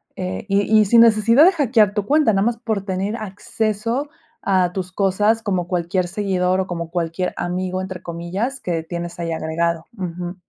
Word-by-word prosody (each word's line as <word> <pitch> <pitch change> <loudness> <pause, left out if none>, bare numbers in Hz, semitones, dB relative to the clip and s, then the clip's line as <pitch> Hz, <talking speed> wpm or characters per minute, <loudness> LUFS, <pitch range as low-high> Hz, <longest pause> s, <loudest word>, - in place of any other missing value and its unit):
eh, 95 +1 -4
y 200 +1 +2 0.2
y 215 - +5
sin 230 +3 +6
necesidad 230 +4 +5
de 365 - +7
hackear 235 - +3
tu 205 -2 -1
cuenta, 290 -3 +3
nada 195 +1 +2
más 235 0 0
por 220 -4 -3
tener 195 +2 -2
acceso 220 +5 -3 0.3
a 185 -3 +2
tus 185 -1 -4
cosas 205 +4 +1
como 185 -5 -1
cualquier 180 +1 -1
seguidor, 185 -1 0
o 190 - -1
como 170 -2 -5
cualquier 175 +1 -2
"amigo", 185 +1 -2
entre 185 -1 -7
comillas, 185 +10 -4
que 170 -6 -3
tienes 170 +1 -6
ahí 170 -1 -3
agregado. 165 +1 -2
Ujú. 180 -1 -5
190 Hz, 175 wpm, -20 LUFS, 175-215 Hz, 0.3 s, de